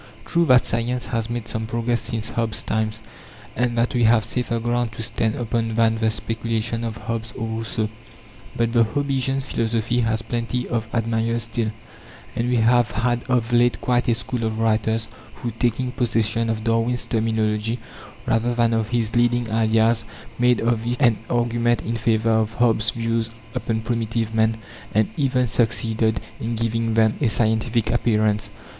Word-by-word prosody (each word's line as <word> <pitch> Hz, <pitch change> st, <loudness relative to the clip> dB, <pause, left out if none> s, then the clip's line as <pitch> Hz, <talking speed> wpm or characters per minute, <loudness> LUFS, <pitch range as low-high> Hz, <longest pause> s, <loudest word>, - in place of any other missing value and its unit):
True, 170 Hz, -1 st, +2 dB
that 125 Hz, -2 st, +6 dB
science 120 Hz, +2 st, -1 dB
has 115 Hz, -1 st, -2 dB
made 120 Hz, -1 st, -4 dB
some 110 Hz, 0 st, -3 dB
progress 115 Hz, +1 st, -1 dB
since 115 Hz, -1 st, -4 dB
Hobbes's 115 Hz, -2 st, -1 dB
time, 110 Hz, 0 st, 0 dB, 0.7 s
and 120 Hz, 0 st, 0 dB
that 115 Hz, +1 st, +1 dB
we 120 Hz, -2 st, +3 dB
have 110 Hz, -1 st, +5 dB
safer 120 Hz, -2 st, -1 dB
ground 120 Hz, 0 st, -1 dB
to 115 Hz, -, -5 dB
stand 110 Hz, 0 st, -1 dB
upon 115 Hz, -1 st, -1 dB
than 115 Hz, -1 st, +3 dB
the 110 Hz, 0 st, +2 dB
speculations 115 Hz, 0 st, -2 dB
of 115 Hz, -1 st, -4 dB
Hobbes 115 Hz, -1 st, -4 dB
or 115 Hz, -, -4 dB
Rousseau. 110 Hz, -1 st, -2 dB, 0.7 s
But 115 Hz, 0 st, +1 dB
the 120 Hz, -1 st, +5 dB
Hobbesian 135 Hz, +2 st, 0 dB
philosophy 115 Hz, -1 st, 0 dB
has 110 Hz, -1 st, 0 dB
plenty 120 Hz, +2 st, -2 dB
of 115 Hz, -2 st, -2 dB
admirers 115 Hz, 0 st, 0 dB
still; 115 Hz, -1 st, -2 dB, 0.7 s
and 120 Hz, +1 st, 0 dB
we 125 Hz, -, +2 dB
have 120 Hz, 0 st, +4 dB
had 120 Hz, +3 st, 0 dB
of 120 Hz, -2 st, 0 dB
late 120 Hz, 0 st, +3 dB
quite 120 Hz, -1 st, +1 dB
a 120 Hz, -, +3 dB
school 120 Hz, 0 st, -4 dB
of 110 Hz, 0 st, -1 dB
writers 110 Hz, 0 st, +1 dB, 0.3 s
who, 120 Hz, -, -4 dB
taking 120 Hz, +2 st, -1 dB
possession 115 Hz, -2 st, 0 dB
of 110 Hz, -1 st, -2 dB
Darwin's 115 Hz, +2 st, +1 dB
terminology 110 Hz, 0 st, 0 dB, 0.5 s
rather 120 Hz, +2 st, +1 dB
than 115 Hz, -1 st, +2 dB
of 115 Hz, -1 st, 0 dB
his 115 Hz, -2 st, -1 dB
leading 120 Hz, -1 st, +2 dB
ideas, 115 Hz, +1 st, +3 dB, 0.4 s
made 125 Hz, 0 st, +3 dB
of 115 Hz, -1 st, +1 dB
it 120 Hz, +1 st, -1 dB
an 120 Hz, -6 st, +4 dB
argument 120 Hz, 0 st, +1 dB
in 115 Hz, -, -2 dB
favour 115 Hz, 0 st, +1 dB
of 110 Hz, 0 st, +1 dB
Hobbes's 115 Hz, -3 st, +3 dB
views 115 Hz, -1 st, -1 dB, 0.2 s
upon 110 Hz, -1 st, -2 dB
primitive 115 Hz, -1 st, -2 dB
man, 110 Hz, 0 st, +2 dB, 0.4 s
and 110 Hz, -1 st, +3 dB
even 130 Hz, -3 st, +1 dB
succeeded 110 Hz, -1 st, +1 dB, 0.2 s
in 115 Hz, +1 st, -2 dB
giving 115 Hz, 0 st, -1 dB
them 110 Hz, -1 st, +3 dB
a 135 Hz, -, +3 dB
scientific 110 Hz, +1 st, +1 dB
appearance. 110 Hz, -3 st, +1 dB
115 Hz, 165 wpm, -22 LUFS, 110-120 Hz, 0.7 s, that